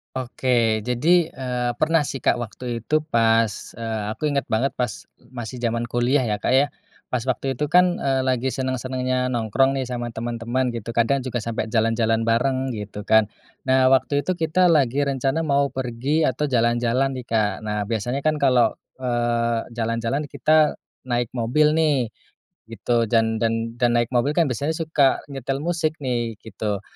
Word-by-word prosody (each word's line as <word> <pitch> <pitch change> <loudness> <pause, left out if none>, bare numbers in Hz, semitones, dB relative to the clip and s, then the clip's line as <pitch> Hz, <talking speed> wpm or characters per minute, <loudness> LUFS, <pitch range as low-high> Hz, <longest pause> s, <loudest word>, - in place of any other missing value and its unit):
Oke, 120 -3 +1
jadi, 160 +8 +3
eee, 125 -4 -3
pernah 155 +2 +2
sih, 135 - -5
Kak, - - +2
waktu 120 +1 -5
itu 155 +7 0
pas, 115 -6 +3 0.2
eee, 115 -1 -4
aku 150 +6 -1
ingat 140 -2 -1
banget 125 +6 +1
pas 120 -5 -3
masih 120 0 -8
zaman 115 -1 -1
kuliah, 125 +3 +2
ya 105 -4 -1
Kak, 120 - 0
ya. 140 +2 +4 0.4
Pas 125 - 0
waktu 130 0 -2
itu 150 - 0
kan, 180 +3 +4
eee, 135 -1 0
lagi 130 -1 0
senang-senangnya 130 -1 -1
nongkrong 125 +2 +1
nih 135 - -1
sama 120 -2 -4
teman-teman, 120 +2 -2
gitu. 115 0 -6
Kadang 120 +4 +2
juga 125 -3 -3
sampai 115 -1 -3
jalan-jalan 115 0 +1
bareng, 130 +3 +1
gitu 105 -2 -6
kan. 110 +1 +4 0.4
Nah, 130 0 +4
waktu 135 +2 +2
itu 185 +2 -2
kita 170 +3 +3
lagi 140 -3 +3
rencana 135 +3 0
mau 140 -2 +2
pergi 130 +4 -1
atau 150 0 +1
jalan-jalan 120 +1 +1
nih, 130 -2 -6
Kak. 110 -3 +1
Nah, 105 0 -1
biasanya 115 +5 -2
kan 155 0 +1
kalau, 125 -4 +4 0.3
eee, 120 -1 0
jalan-jalan 115 +5 -2
kita 155 0 +3 0.2
naik 120 -1 -1
mobil 145 +6 +2
nih, 150 -6 +2 0.6
gitu. 115 +2 0
Dan 110 0 +2
dan 115 0 -1
dan 120 -1 +2
naik 120 -1 +1
mobil 125 +4 +2
kan 170 -2 +4
biasanya 140 +5 -1
suka 155 -5 +2
nyetel 135 0 -3
musik 160 -2 -1
nih, 120 -3 -1
gitu. 105 -2 -4
125 Hz, 165 wpm, -23 LUFS, 115-140 Hz, 0.6 s, ya